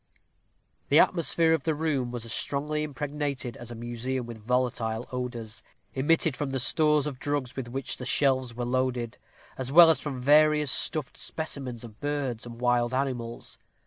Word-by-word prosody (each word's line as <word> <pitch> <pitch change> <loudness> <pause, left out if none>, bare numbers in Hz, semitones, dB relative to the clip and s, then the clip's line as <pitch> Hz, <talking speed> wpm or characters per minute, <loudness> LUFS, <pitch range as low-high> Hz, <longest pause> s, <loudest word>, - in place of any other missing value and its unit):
The - - +5
atmosphere 165 -2 +3
of 160 - +1
the 160 +2 -1
room 145 -5 -1
was 120 -1 -5
as 115 - -3
strongly 150 +2 0
impregnated 145 -4 -4
as 120 - -10
a 120 - -7
museum 120 +2 -4
with 115 -1 -9
volatile 120 -1 -1
odors, 120 -3 -5 0.3
emitted 150 +1 +2
from 145 +1 -3
the 135 0 -2
stores 150 +2 +3
of 140 -4 -5
drugs 145 -4 -2
with 130 -3 -5
which 135 +2 -2
the 125 - -7
shelves 130 -4 +2
were 120 0 -3
loaded, 125 -2 -2 0.4
as 130 0 -2
well 165 +2 +9
as 160 - 0
from 140 -4 -4
various 150 +1 +4
stuffed 155 -5 +2
specimens 135 -7 -4
of 110 -3 -12
birds 140 -5 -3
and 115 0 -10
wild 120 0 +1
animals. 125 -4 -4
130 Hz, 170 wpm, -27 LUFS, 120-145 Hz, 0.4 s, well